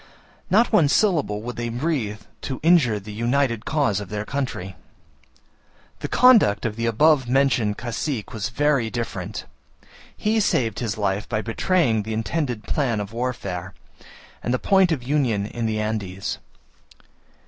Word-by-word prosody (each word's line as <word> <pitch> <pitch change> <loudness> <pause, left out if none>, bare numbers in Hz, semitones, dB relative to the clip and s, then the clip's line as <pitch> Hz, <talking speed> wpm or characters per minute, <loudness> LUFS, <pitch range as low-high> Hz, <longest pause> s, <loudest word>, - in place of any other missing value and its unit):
Not 225 +5 +3
one 170 -9 +5
syllable 145 - +1
would 120 0 -6
they 120 0 -2
breathe 120 -5 -2 0.2
to 130 - -4
injure 150 -11 +4
the 105 +1 -9
united 115 0 0
cause 140 -10 +1
of 100 -3 -7
their 105 0 -3
country! 125 -10 -4 1.2
The - - -3
conduct 230 - +5
of 110 -2 -2
the 115 +1 -1
above 130 +2 +3
mentioned 125 -6 +2
cacique 120 -1 -4
was 105 -2 -3
very 140 -2 +1
different; 115 0 -5 0.7
he 220 +1 +1
saved 115 - +1
his 115 -3 -2
life 100 0 -1
by 110 -2 -1
betraying 120 - +1
the 110 +2 -5
intended 120 0 -2
plan 120 -2 0
of 105 +1 -5
warfare, 100 -7 -4 0.7
and 120 - -2
the 130 - +2
point 190 +4 +3
of 140 -7 -1
union 125 -7 +1
in 115 +1 -3
the 110 -1 -1
Andes. 105 -1 -3
120 Hz, 150 wpm, -23 LUFS, 105-140 Hz, 1.2 s, one